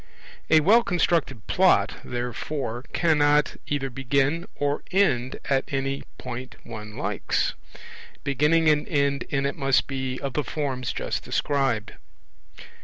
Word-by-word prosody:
A 155 - +6
well 215 +9 +6
constructed 165 - 0
Plot, - - +3
therefore, 125 +1 -4
cannot 150 -3 +3
either 135 -2 -1
begin 140 +6 0
or 145 0 -1
end 135 -11 +2
at 135 -1 +2
any 135 0 -1 0.2
point 125 0 -7
one 110 -2 -8
likes; - - -1 0.7
beginning 150 +4 +3
and 150 -1 +3
end 140 -3 +1
in 140 -1 0
it 140 - -1
must 135 -3 +2
be 130 -1 -3
of 140 -2 -4
the 150 - 0
forms 135 -5 -2
just - - -3
described. 135 -7 0
140 Hz, 125 wpm, -25 LUFS, 130-150 Hz, 0.7 s, A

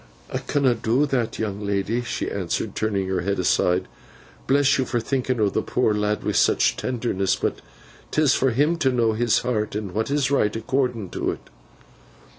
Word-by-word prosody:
'I - - 0
canna 140 -4 +2
do 120 +5 +1
that, 130 -5 -1
young 105 -2 -3
lady,' 100 +4 -1
she 120 - -3
answered, - - -2
turning 100 -3 -1
her 95 -1 -1
head 100 +3 -1
aside. 90 0 +1 0.6
'Bless 140 0 +3
you 130 - +1
for 120 - -1
thinking 130 +1 -1
o' 105 - +3
the - - 0
poor 120 -4 +1
lad 105 0 -1
wi' - - 0
such - - +3
tenderness. 115 -6 -1
But - - -2 0.5
'tis 150 -4 +3
for 135 - +2
him 145 +8 +2
to 135 -5 +2
know 115 -3 +2
his 115 0 +2
heart, 110 -4 -1
and 105 -3 -3
what 110 +6 -2
is 140 -1 +1
right 105 -7 +2
according 120 -4 -1
to - - -2
it. - - -7
115 Hz, 185 wpm, -23 LUFS, 105-130 Hz, 0.6 s, Bless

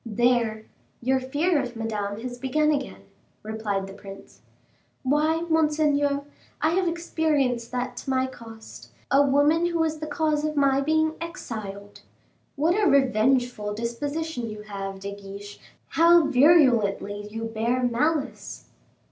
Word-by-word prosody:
"There, 230 -1 +1 0.3
your 260 +2 +1
fear 290 +5 +1
of 245 -2 -6
Madame 210 -2 -3
has 245 0 -6
begun 300 +4 +1
again," 280 -2 -3 0.4
replied 215 -2 -3
the 195 - -10
prince. 195 -1 -12 0.6
"Why, 305 +4 +2
monseigneur, 300 -3 +2 0.4
I 315 +2 +2
have 365 +1 +1
experienced 300 -8 0
that 250 0 -3
to - - -6
my 260 0 +2
cost; 225 -4 -11 0.2
a 275 - +6
woman 290 +5 +3
who 340 -1 -1
was 320 -1 0
the 310 - -5
cause 305 0 0
of 305 0 -2
my 275 -1 +3
being 315 +2 +1
exiled!" 215 - -7 0.5
"What 315 +5 +2
a 410 -1 +2
revengeful 245 -4 +2
disposition 245 +3 -3
you 210 0 -8
have, 195 -2 -6
De 200 0 -5
Guiche, 200 +1 -10 0.3
how 335 0 +5
virulently 245 -9 +3
you 225 +1 -6
bear 230 +3 -1
malice." 280 +5 -1
260 Hz, 135 wpm, -25 LUFS, 220-305 Hz, 0.6 s, a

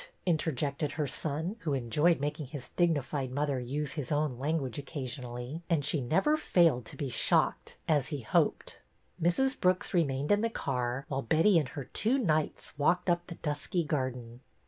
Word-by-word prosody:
interjected 150 -3 0
her 150 0 -1
son, 155 - -2
who 150 -8 -1
enjoyed 140 +7 +2
making 145 0 -3
his 135 -2 -7
dignified 145 -6 0
mother 140 0 0
use 140 +3 -3
his 145 -3 -4
own 145 -4 0
language 145 -2 -1
occasionally, 130 0 -5
and 155 -5 +2
she 150 0 +1
never 190 - +2
failed 165 - +3
to - - -9
be 140 - -2
shocked 125 - +1
as 145 -4 +2
he 145 -4 -4
hoped. 110 - 0 0.4
Mrs. 265 - +2
Brooks 185 +3 +1
remained 145 -4 +1
in 205 0 +4
the 230 - +1
car, 125 - -2
while 135 -1 -2
Betty 165 - +4
and 145 -5 -2
her 140 0 -6
two 225 - +1
knights 155 - -1
walked 175 +5 +3
up 175 0 -1
the 170 - -7
dusky 150 +3 -2
garden. 125 -5 -3
145 Hz, 170 wpm, -31 LUFS, 130-170 Hz, 0.4 s, in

